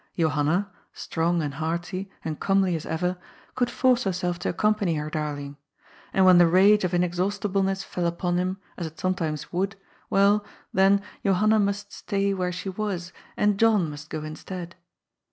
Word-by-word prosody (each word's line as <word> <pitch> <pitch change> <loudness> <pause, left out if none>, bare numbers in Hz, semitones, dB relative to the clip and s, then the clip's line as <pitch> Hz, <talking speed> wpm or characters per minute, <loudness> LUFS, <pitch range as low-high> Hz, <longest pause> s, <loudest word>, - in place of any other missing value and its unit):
Johanna, 160 +4 +1 0.2
strong 170 0 -1
and 145 -2 -3
hearty, 170 +5 -3 0.2
and 155 -2 -3
comely 195 -2 +2
as 160 - -5
ever, 180 +3 -1 0.4
could 245 -2 0
force 255 0 +2
herself 180 -2 -1
to - - -2
accompany 210 -2 +1
her 150 0 -3
darling. 145 -2 -4 0.5
And 190 - +3
when 180 -1 +8
the 175 - +7
rage 195 +4 +5
of 180 -1 0
inexhaustibleness 195 +2 0
fell 175 -2 -2
upon 175 +1 -1
him, 185 +1 -1 0.2
as 170 - -3
it 160 - -13
sometimes 175 -6 -2
would, 195 +4 -1 0.3
well, 200 +1 +4 0.3
then, 195 +1 +4 0.2
Johanna 215 +3 +3
must 205 0 -1
stay 200 0 -1
where 180 -2 -1
she 180 +2 -6
was, 190 -3 -4 0.2
and 210 -1 +2
John 210 -8 +3
must 145 +1 -10
go 155 -1 -4
instead. 170 +3 -7
185 Hz, 160 wpm, -25 LUFS, 170-200 Hz, 0.5 s, when